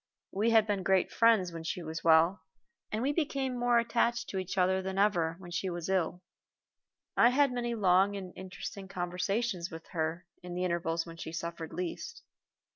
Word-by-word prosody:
We 210 Hz, +4 st, +1 dB
had 225 Hz, -2 st, +5 dB
been 205 Hz, -3 st, -1 dB
great 190 Hz, 0 st, +2 dB
friends 225 Hz, -6 st, +4 dB
when 165 Hz, -1 st, -7 dB
she 170 Hz, +2 st, -3 dB
was 160 Hz, +1 st, -5 dB
well, 165 Hz, +3 st, +5 dB, 0.5 s
and 215 Hz, +2 st, -1 dB
we 285 Hz, +2 st, +1 dB
became 275 Hz, -5 st, -1 dB
more 245 Hz, 0 st, +3 dB
attached 235 Hz, 0 st, +1 dB
to 190 Hz, -, -2 dB
each 185 Hz, +1 st, -5 dB
other 190 Hz, +1 st, +3 dB
than 190 Hz, 0 st, -4 dB
ever 175 Hz, -5 st, +2 dB
when 175 Hz, -2 st, -11 dB
she 180 Hz, +2 st, -2 dB
was 175 Hz, 0 st, -4 dB
ill. 180 Hz, -1 st, 0 dB, 0.9 s
I 235 Hz, -, +6 dB
had 275 Hz, +1 st, +3 dB
many 240 Hz, -1 st, -2 dB
long 195 Hz, -1 st, +3 dB
and 185 Hz, -2 st, -7 dB
interesting 190 Hz, +1 st, -7 dB
conversations 180 Hz, +1 st, -2 dB
with 165 Hz, -1 st, -9 dB
her 160 Hz, +1 st, -2 dB, 0.2 s
in 180 Hz, 0 st, -7 dB
the 180 Hz, -, -1 dB
intervals 170 Hz, -2 st, -1 dB
when 165 Hz, -1 st, -10 dB
she 160 Hz, -, -6 dB
suffered 165 Hz, 0 st, -5 dB
least. 180 Hz, -, -5 dB
185 Hz, 185 wpm, -31 LUFS, 170-225 Hz, 0.9 s, I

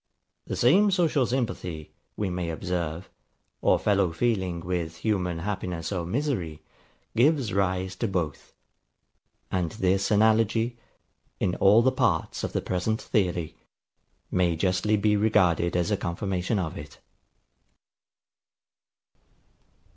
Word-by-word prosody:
The -, -, -3 dB
same 190 Hz, -, +4 dB
social 165 Hz, -, +2 dB
sympathy, 100 Hz, -, -3 dB, 0.3 s
we 100 Hz, -3 st, -1 dB
may 90 Hz, -1 st, -3 dB
observe, 85 Hz, 0 st, -3 dB, 0.5 s
or -, -, +4 dB
fellow 100 Hz, -4 st, +2 dB
feeling 95 Hz, -3 st, -1 dB
with 85 Hz, -2 st, -3 dB
human 90 Hz, -4 st, -1 dB
happiness 90 Hz, -2 st, -4 dB
or 85 Hz, -4 st, -2 dB
misery, 100 Hz, -, -2 dB, 0.5 s
gives 130 Hz, -, +3 dB
rise 95 Hz, -1 st, 0 dB
to 115 Hz, -, -1 dB
both; 90 Hz, -6 st, -3 dB, 1.0 s
and 90 Hz, -3 st, -1 dB
this 95 Hz, -2 st, +1 dB
analogy, 110 Hz, +2 st, +2 dB, 0.6 s
in 90 Hz, -, 0 dB
all 105 Hz, +4 st, +5 dB
the 130 Hz, -, +4 dB
parts -, -, 0 dB
of -, -, -2 dB
the -, -, -1 dB
present 100 Hz, +5 st, -1 dB
theory, 90 Hz, -7 st, -1 dB, 0.8 s
may 90 Hz, -2 st, +2 dB
justly 95 Hz, +5 st, +1 dB
be 105 Hz, +1 st, +2 dB
regarded 95 Hz, -5 st, +2 dB
as 90 Hz, +4 st, +1 dB
a 105 Hz, -, +2 dB
confirmation 95 Hz, +3 st, -2 dB
of 85 Hz, -5 st, -3 dB
it. 75 Hz, 0 st, -11 dB
95 Hz, 115 wpm, -26 LUFS, 85-110 Hz, 1.0 s, all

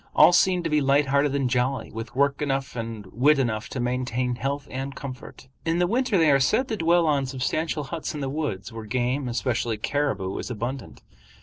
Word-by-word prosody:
All -, -, +7 dB
seemed 180 Hz, -1 st, +3 dB
to 165 Hz, -, -1 dB
be 150 Hz, -1 st, +3 dB
light 140 Hz, +1 st, +3 dB
hearted 140 Hz, 0 st, +2 dB
and 135 Hz, -2 st, +1 dB
jolly, 125 Hz, +2 st, -1 dB
with 115 Hz, +2 st, -7 dB
work 140 Hz, +1 st, +2 dB
enough 135 Hz, -3 st, -1 dB
and 115 Hz, -3 st, -5 dB
wit 145 Hz, +6 st, +4 dB
enough 115 Hz, -5 st, -1 dB
to 130 Hz, -, -5 dB
maintain 125 Hz, 0 st, -1 dB
health 140 Hz, +3 st, -3 dB
and 135 Hz, +1 st, -4 dB
comfort. 130 Hz, -1 st, -9 dB, 0.2 s
In 165 Hz, +1 st, 0 dB
the 175 Hz, -, +3 dB
winter 235 Hz, +2 st, +1 dB
they 160 Hz, -3 st, +5 dB
are 135 Hz, -, +5 dB
said 220 Hz, -, +2 dB
to 225 Hz, -, 0 dB
dwell 170 Hz, -1 st, +3 dB
in 135 Hz, -1 st, -2 dB
substantial 150 Hz, +4 st, -2 dB
huts 160 Hz, +2 st, -5 dB
in -, -, -4 dB
the 135 Hz, -, -2 dB
woods, 135 Hz, -8 st, -3 dB
where 115 Hz, -1 st, -7 dB
game, 125 Hz, +4 st, -1 dB
especially 120 Hz, -2 st, -1 dB
caribou, 105 Hz, -7 st, -1 dB
is -, -, -5 dB
abundant. 125 Hz, +3 st, -5 dB
135 Hz, 205 wpm, -25 LUFS, 125-150 Hz, 0.2 s, All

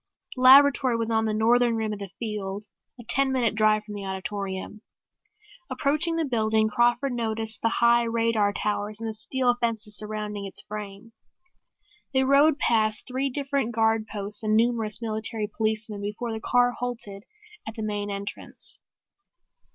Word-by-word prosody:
The 255 Hz, -, -6 dB
laboratory 265 Hz, -1 st, +6 dB
was 230 Hz, 0 st, -2 dB
on 220 Hz, 0 st, +1 dB
the 215 Hz, -, -1 dB
Northern 235 Hz, +2 st, +3 dB
rim 220 Hz, -1 st, -2 dB
of 205 Hz, -, -7 dB
the 200 Hz, -1 st, -7 dB
field, 210 Hz, -2 st, -4 dB, 0.3 s
a -, -, -9 dB
ten 275 Hz, +1 st, +3 dB
minute 245 Hz, -5 st, +1 dB
drive 215 Hz, -1 st, +2 dB
from 210 Hz, -1 st, -9 dB
the 205 Hz, -1 st, -6 dB
auditorium. 190 Hz, +1 st, -5 dB, 0.9 s
Approaching 305 Hz, +4 st, +1 dB
the 330 Hz, -1 st, 0 dB
building, 220 Hz, -4 st, +1 dB
Crawford 240 Hz, +4 st, +1 dB
noticed 225 Hz, -2 st, -2 dB
the 230 Hz, -, +2 dB
high 235 Hz, +1 st, +3 dB
radar 230 Hz, -3 st, +1 dB
towers 210 Hz, +1 st, -2 dB
and 225 Hz, -, -4 dB
the 220 Hz, -, -4 dB
steel 245 Hz, +3 st, 0 dB
fences 220 Hz, -3 st, -2 dB
surrounding 210 Hz, -1 st, -2 dB
its 195 Hz, -, +2 dB
frame. 210 Hz, +1 st, -8 dB, 1.0 s
They 265 Hz, -, +4 dB
rode 280 Hz, +3 st, +4 dB
past 220 Hz, -5 st, +1 dB
three 260 Hz, +2 st, -1 dB
different 275 Hz, -3 st, -2 dB
guard 220 Hz, -1 st, +1 dB
posts 205 Hz, -1 st, -5 dB
and 215 Hz, -1 st, +1 dB
numerous 225 Hz, -1 st, +2 dB
military 220 Hz, 0 st, -2 dB
policemen 215 Hz, 0 st, -3 dB
before 210 Hz, +3 st, -4 dB
the 220 Hz, -, -5 dB
car 245 Hz, 0 st, +3 dB
halted 235 Hz, -5 st, -5 dB, 0.5 s
at 220 Hz, -, -6 dB
the 220 Hz, -, -5 dB
main 205 Hz, -1 st, -3 dB
entrance. 200 Hz, 0 st, -5 dB
220 Hz, 160 wpm, -25 LUFS, 210-240 Hz, 1.0 s, laboratory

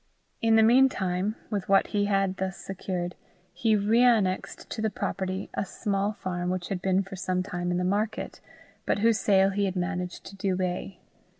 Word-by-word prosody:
In 225 Hz, 0 st, +4 dB
the 220 Hz, -, +6 dB
mean 255 Hz, +4 st, +6 dB
time, 190 Hz, 0 st, -1 dB, 0.2 s
with 200 Hz, -3 st, -2 dB
what 195 Hz, 0 st, +5 dB
he 205 Hz, -1 st, +2 dB
had 195 Hz, -2 st, +1 dB
thus 190 Hz, 0 st, -3 dB
secured, 180 Hz, -2 st, -4 dB, 0.4 s
he 225 Hz, -2 st, +2 dB
reannexed 215 Hz, -2 st, +2 dB
to 220 Hz, -, -4 dB
the 220 Hz, -, +1 dB
property 190 Hz, -1 st, -3 dB
a -, -, -1 dB
small 200 Hz, +1 st, -1 dB
farm 180 Hz, -3 st, -3 dB
which 180 Hz, -1 st, -3 dB
had 190 Hz, -2 st, -3 dB
been 190 Hz, +1 st, +2 dB
for 195 Hz, +1 st, -9 dB
some 185 Hz, 0 st, -1 dB
time 175 Hz, -2 st, -3 dB
in 175 Hz, -, 0 dB
the 180 Hz, -, 0 dB
market, 205 Hz, +4 st, -2 dB, 0.5 s
but -, -, +2 dB
whose 230 Hz, -1 st, +4 dB
sale 195 Hz, -1 st, +4 dB
he 200 Hz, +1 st, 0 dB
had 190 Hz, -1 st, -2 dB
managed 180 Hz, 0 st, -3 dB
to 195 Hz, -, -10 dB
delay. 185 Hz, -1 st, -2 dB
195 Hz, 185 wpm, -27 LUFS, 185-205 Hz, 0.5 s, the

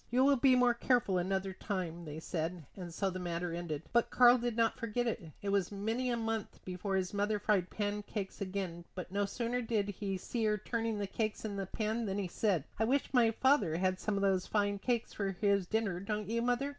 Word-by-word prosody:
"You 250 Hz, +2 st, +3 dB
will 280 Hz, 0 st, +6 dB
be 260 Hz, 0 st, +5 dB
more 250 Hz, -1 st, +5 dB
careful 235 Hz, -6 st, +2 dB
another 190 Hz, +1 st, -1 dB
time," 180 Hz, -4 st, -4 dB
they 150 Hz, 0 st, -6 dB
said; 165 Hz, 0 st, -3 dB
and 180 Hz, -3 st, -7 dB
so 190 Hz, +3 st, -1 dB
the 185 Hz, -, -5 dB
matter 175 Hz, -1 st, -2 dB
ended. 165 Hz, -3 st, -4 dB
But 235 Hz, -1 st, +3 dB
Karl 245 Hz, 0 st, +7 dB
did 235 Hz, -1 st, -2 dB
not 230 Hz, -1 st, +2 dB
forget 230 Hz, +1 st, -1 dB
it. 195 Hz, -8 st, -3 dB
It 200 Hz, -, -1 dB
was 200 Hz, -2 st, +1 dB
many 225 Hz, +5 st, -1 dB
a 240 Hz, -, +1 dB
month 225 Hz, -2 st, -3 dB
before 185 Hz, +2 st, -2 dB
his 185 Hz, 0 st, -1 dB
mother 205 Hz, +1 st, +1 dB
fried 205 Hz, -3 st, +1 dB
pancakes 205 Hz, -1 st, -3 dB
again, 185 Hz, -3 st, -3 dB
but 180 Hz, -1 st, -6 dB
no 200 Hz, +1 st, +1 dB
sooner 240 Hz, +3 st, -1 dB
did 220 Hz, -3 st, 0 dB
he 195 Hz, -1 st, -3 dB
see 225 Hz, +4 st, -2 dB
her 210 Hz, 0 st, +2 dB
turning 225 Hz, +1 st, -2 dB
the 205 Hz, -, -1 dB
cakes 215 Hz, +2 st, -2 dB
in 205 Hz, -2 st, -3 dB
the 195 Hz, -1 st, -3 dB
pan 220 Hz, +2 st, -1 dB
than 195 Hz, 0 st, -1 dB
he 200 Hz, -2 st, -1 dB
said: 180 Hz, -4 st, +1 dB, 0.2 s
"I -, -, +3 dB
wish 275 Hz, +5 st, +1 dB
my 240 Hz, -3 st, +5 dB
father 245 Hz, -, +3 dB
had 185 Hz, +1 st, +1 dB
some 210 Hz, -2 st, -1 dB
of 200 Hz, -, 0 dB
these 190 Hz, -2 st, +2 dB
fine 205 Hz, -1 st, +1 dB
cakes 235 Hz, +1 st, -1 dB
for 195 Hz, -2 st, -2 dB
his 200 Hz, -3 st, +2 dB
dinner, 215 Hz, -4 st, 0 dB
don't 210 Hz, +1 st, -3 dB
you, 230 Hz, +2 st, 0 dB
mother?" 245 Hz, +3 st, +1 dB
205 Hz, 225 wpm, -33 LUFS, 185-230 Hz, 0.2 s, Karl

